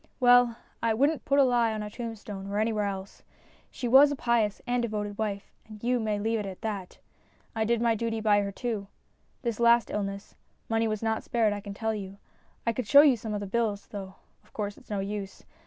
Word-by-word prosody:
Well, 245 -2 +5 0.2
I 230 -1 +1
wouldn't 285 +6 +1
put 280 - +2
a 280 - +7
lie 240 -3 +3
on 215 -1 -3
a 210 - -5
tomb 230 -1 -5
stone 200 -2 -8
or 200 +1 -3
anywhere 215 -1 +1
else. 195 -1 -6 0.5
She 245 - -4
was 275 +4 +7
a - - -1
pious 235 -5 +1
and 245 0 0
devoted 210 -3 -3
wife, 205 -2 -3 0.2
and 215 0 -12
you 245 +1 +2
may 215 -2 -1
leave 220 +2 0
it 210 - -4
at 190 -1 -8
that. 200 -5 -4 0.6
I 220 0 +1
did 235 +1 +1
my 230 -1 +3
duty 225 0 -2
by 210 -2 +3
her 200 0 -3
too. 215 -2 -4 0.6
This 235 -3 -2
last 235 0 +4
illness, 200 -1 -4 0.3
money 225 0 +1
was 215 0 -3
not 220 0 0
spared 225 -3 +1
I 205 - -4
can 200 -1 -8
tell 220 +1 -1
you. 200 -2 -6 0.5
I 230 - +1
could 245 -2 -4
show 280 +7 +9
you 290 -4 +5
the 210 -2 -4
bills, 210 0 -1
though 195 -2 -7 0.3
of - - -27
course 205 -1 -3
it's - - -19
no 205 -2 -1
use. 195 -1 -5
220 Hz, 220 wpm, -28 LUFS, 205-235 Hz, 0.6 s, show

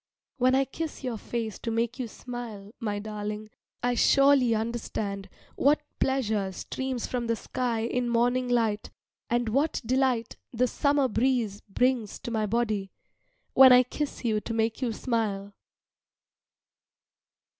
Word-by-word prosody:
When 255 +1 +4
I 270 0 +3
kiss 310 +2 -6
your 240 -4 -3
face 225 -2 -4
to 230 - -4
make 230 +2 -1
you 250 - -2
smile, 225 -4 -8
my 210 -4 -2
darling, 210 0 -5 0.3
I 245 0 +2
surely 275 -1 +5
understand 215 -3 -3 0.3
what 295 +2 +3 0.2
pleasure 220 -7 0
streams 260 +4 -3
from 245 -2 -3
the 230 - +1
sky 235 +1 -2
in 240 +1 -1
morning 245 +2 +2
light, 225 -4 +1 0.4
and 240 -1 +1
what 280 +8 +1
delight 255 -2 +1
the 245 +1 +2
summer 280 +2 +2
breeze 230 -4 0
brings 245 0 +1
to 235 - -5
my 215 -2 0
body 215 -3 0 0.6
when 265 -1 +9
I 250 0 +8
kiss 275 +1 -4
you 215 -2 +2
to 230 - -5
make 225 +2 0
you 245 -3 0
smile. 210 -4 -2
235 Hz, 140 wpm, -28 LUFS, 215-255 Hz, 0.6 s, when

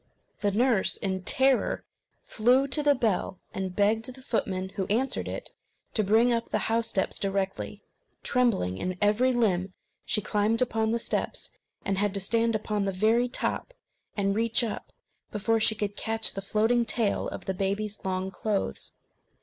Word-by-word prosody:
The 205 - +1
nurse 225 0 +2
in 190 -1 -2
terror 265 +6 +2 0.4
flew 250 +5 +3
to 300 - +3
the 290 -1 +4
bell, 215 -6 0
and 190 -1 -3
begged 220 +3 +2
the 260 - -13
footman, 190 -6 -1
who 190 -1 -3
answered 245 +6 0
it, - - -6 0.4
to 215 - +2
bring 225 +5 +4
up 230 0 -1
the - - +1 0.2
house 230 0 +1
steps 190 - -1
directly. 195 -1 -2 0.4
Trembling 200 - +1
in 185 0 -3
every 210 +5 +3
limb, 195 -6 +1 0.3
she - - +1
climbed 210 +2 +1
upon 225 -3 +1
the 230 - +1
steps, 235 - -3 0.3
and 195 -1 0
had 205 -1 0
to - - +1
stand 230 +3 +1
upon 210 -1 -1
the 195 - 0
very 220 +6 +2
top, - - -2 0.4
and 195 -1 +2
reach 230 +2 +1
up, 225 - -4 0.4
before 225 +2 +1
she 220 0 +3
could 205 -1 -3
catch 225 +1 0
the 195 - -4
floating 220 +4 +2
tail 225 -2 0
of - - -7
the 190 - -1
baby's 200 +3 -2
long 190 0 -2
clothes. 195 - -2
215 Hz, 165 wpm, -28 LUFS, 195-230 Hz, 0.4 s, the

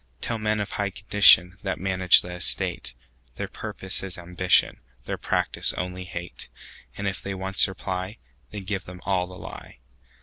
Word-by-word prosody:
Tell 115 -1 -3
men 110 0 +1
of 105 - -3
high 100 -1 -1
condition, 95 -2 +5
That 95 -2 -3
manage 95 -1 +6
the 90 - -8
estate, 90 -7 -1 0.4
Their - - -4
purpose 95 -1 -3
is 95 -2 -5
ambition, 90 +1 +2 0.3
Their - - -4
practice - - 0
only 90 0 -5
hate:And 90 +3 -9
if 100 0 -3
they 100 0 -5
once 95 +1 +1
reply, 95 +2 -5 0.3
Then 105 -2 -7
give 95 0 -4
them 90 0 -10
all 90 -1 0
the 90 0 -11
lie. - - -10
95 Hz, 160 wpm, -25 LUFS, 90-100 Hz, 0.4 s, manage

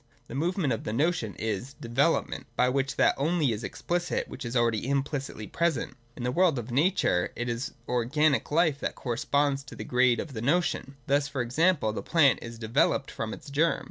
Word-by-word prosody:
The - - -7
movement 160 -1 0
of 115 - -4
the 105 - -3
Notion 140 - 0
is 110 +5 -3
development: 130 +8 0
by 125 - +3
which_Jhat 135 +1 +2
only 150 -1 +1
.is. 110 +1 -4
explicit 175 0 -2
which - - -8
is 120 +1 -4
.alrca4x.iHipli£itly 130 +1 -1
present. 170 -4 0 0.2
In 120 - -7
the 125 - 0
world 170 0 +3
of 120 0 -5
nature 135 - +2
it 120 - -3
is 120 +2 -3
organic 135 +5 +1
life 155 -2 +2
that - - -3
corresponds 140 +2 0
to - - -10
the - - -6
grade 125 -1 +3
of 150 - -5
the 110 - -5
notion. 140 -1 0
Thus 140 +1 +2
e.g. 120 -2 -2
the 160 -10 +2
plant 145 -7 +4
is 115 0 -8
developed 115 +4 +1
from 110 0 -4
its 140 - -9
germ. 160 +4 +2
135 Hz, 180 wpm, -28 LUFS, 120-155 Hz, 0.2 s, plant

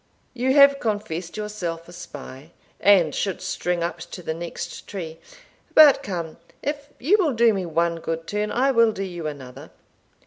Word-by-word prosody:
You 260 +2 +1
have 280 -1 +7
confessed 205 -7 -3
yourself 180 -6 -4
a 175 - -13
spy, 145 -2 -10 0.3
and 180 -7 +5
should 195 -3 -2
string 175 -1 -2
up 170 0 -3
to 180 +1 -9
the 160 - -2
next 170 +1 -7
tree 165 -5 -7 0.6
But 300 -3 +8
come, 170 -5 -5 0.3
if 290 0 -3
you 345 - +3
will 320 -8 +2
do 230 -1 +4
me 190 -3 -3
one 170 +1 0
good 165 0 -4
turn, 210 +2 -2
I 265 +3 +2
will 230 -3 +4
do 195 - -4
you 175 -4 -5
another. 135 -3 -9
180 Hz, 170 wpm, -23 LUFS, 165-230 Hz, 0.6 s, But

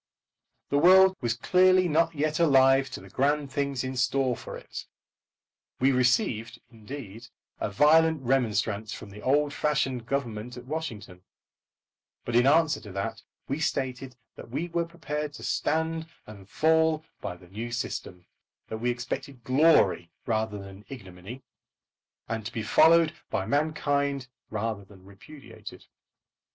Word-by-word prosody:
The 140 - +2
world 190 +3 +7
was 120 -2 0
clearly 185 +7 +4
not 165 +1 +2
yet 155 +2 -1
alive 135 -4 +5
to - - -7
the - - -13
grand 145 +1 0
things 140 -2 -1
in 130 0 -4
store 130 0 +1
for - - -8
it. - - -9 0.9
We 130 +2 +4
received, 125 - +1
indeed, 115 -1 -9 0.3
a - - -1
violent 155 +6 +4
remonstrance 110 -4 0
from 100 - -9
the 105 +1 -11
old 145 +3 +2
fashioned 135 -5 -1
Government 125 -3 -3
at 125 - -10
Washington; 115 - -6 1.0
but 120 - -3
in 120 +2 +5
answer 160 +2 +3
to 105 - -10
that 110 +4 -4 0.3
we 140 +3 -2
stated 130 -4 -2 0.2
that - - -11
we 160 +8 -3
were 170 0 -1
prepared 150 -3 -5
to - - -10
stand 160 +1 -1 0.2
and 100 -2 -13
fall 160 +1 +2 0.2
by - - -4
the 90 - -17
new 115 +5 -6
system 90 -6 -5 0.4
that 110 - -5
we 120 +2 0
expected 120 +1 -5
glory 130 - +4 0.2
rather 110 -2 -1
than 100 0 -11
ignominy, 110 0 -10 0.8
and 115 -1 -3
to - - -7
be 115 -3 -4
followed 160 +8 +5 0.2
by 95 - -1
mankind 140 -2 0 0.2
rather 110 -1 -3
than 95 -1 -18
repudiated. 135 +9 -12
130 Hz, 140 wpm, -27 LUFS, 110-150 Hz, 1.0 s, world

